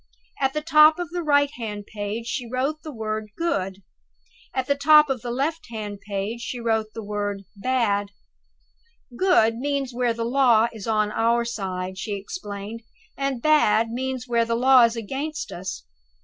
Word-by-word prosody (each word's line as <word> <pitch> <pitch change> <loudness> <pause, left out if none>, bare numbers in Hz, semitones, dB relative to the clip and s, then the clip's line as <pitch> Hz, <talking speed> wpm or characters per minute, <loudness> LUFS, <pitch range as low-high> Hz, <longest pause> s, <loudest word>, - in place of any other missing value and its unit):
At 270 -1 +1
the 305 - -2
top 310 -1 +6
of 350 -2 -5
the 350 0 -2
right 285 -2 +3
hand 210 -6 -6
page 210 +2 -5
she 240 0 -4
wrote 270 +5 -1
the 310 - -7
word 215 -3 -4
Good. 195 - -2 0.7
At 260 - -1
the 280 - +2
top 300 +1 +6
of 255 -4 -2
the 240 - -5
left 310 +6 -2
hand 210 -3 -6
page 205 +3 -4
she 245 +1 -5
wrote 225 -2 0
the 225 - -5
word 205 -1 -3
Bad. 205 -3 0 1.1
"'Good' 235 -11 +3
means 275 -1 -2
where 240 -1 0
the 230 0 -2
law 235 -3 +4
is 220 -2 -8
on 215 -1 +1
our 235 +2 +2
side," 190 -4 -4
she 205 0 -3
explained; 205 - -7 0.3
"and 275 -3 -2
'Bad' 230 -7 +4
means 255 +1 -3
where 235 -1 +2
the 230 0 -1
law 255 0 +6
is 230 0 -1
against 275 +8 -4
us. 175 - -6
235 Hz, 170 wpm, -24 LUFS, 215-275 Hz, 1.1 s, top